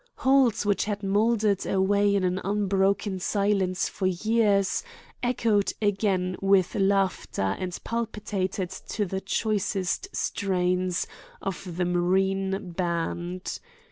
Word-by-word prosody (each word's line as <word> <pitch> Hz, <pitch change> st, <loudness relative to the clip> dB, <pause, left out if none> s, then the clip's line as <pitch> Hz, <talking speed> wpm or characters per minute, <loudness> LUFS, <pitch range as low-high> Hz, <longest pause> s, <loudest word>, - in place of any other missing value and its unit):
"Halls 260 Hz, -6 st, +3 dB
which 205 Hz, -1 st, +1 dB
had 205 Hz, -1 st, -3 dB
moldered 210 Hz, 0 st, +2 dB
away 200 Hz, +1 st, +2 dB
in 195 Hz, -, +1 dB
an 185 Hz, +1 st, 0 dB
unbroken 195 Hz, 0 st, +1 dB
silence 195 Hz, -1 st, +1 dB
for 190 Hz, -, -2 dB
years 200 Hz, +1 st, +2 dB, 0.4 s
echoed 230 Hz, -5 st, +1 dB
again 195 Hz, -3 st, +1 dB
with 195 Hz, -2 st, +3 dB
laughter 195 Hz, -, +1 dB
and 180 Hz, -1 st, -3 dB
palpitated 210 Hz, -5 st, -2 dB
to 205 Hz, +2 st, -3 dB
the 190 Hz, +1 st, -3 dB
choicest 205 Hz, -, -1 dB
strains 180 Hz, -2 st, 0 dB, 0.3 s
of 180 Hz, -2 st, -5 dB
the 180 Hz, -, +1 dB
Marine 190 Hz, +2 st, 0 dB
Band. 175 Hz, +1 st, -3 dB
195 Hz, 110 wpm, -26 LUFS, 185-205 Hz, 0.4 s, Halls